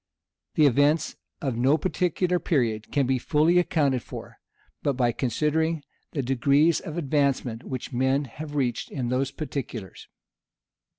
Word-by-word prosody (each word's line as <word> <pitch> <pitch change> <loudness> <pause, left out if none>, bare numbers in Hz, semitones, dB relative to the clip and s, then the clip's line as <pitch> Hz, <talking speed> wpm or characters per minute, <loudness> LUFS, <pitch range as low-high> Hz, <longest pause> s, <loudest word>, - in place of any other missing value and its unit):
The 155 - +5
events 145 +4 +3 0.3
of 135 -4 -1
no 130 +6 +3
particular 180 +1 0
period 115 -10 0
can 140 -2 +2
be 130 0 +1
fully 160 +7 +3
accounted 145 -7 +1
for, - - -10 0.4
but 140 - +1
by 125 -2 +2
considering 150 +6 0 0.3
the 140 - -1
degrees 140 +5 +3
of 160 +1 -7
advancement 140 -6 0
which 130 0 -6
men 130 +3 +1
have 145 +4 -8
reached 125 -5 -1
in 125 -4 -3
those 130 +2 0
particulars. 135 - -6
140 Hz, 135 wpm, -26 LUFS, 125-155 Hz, 0.4 s, The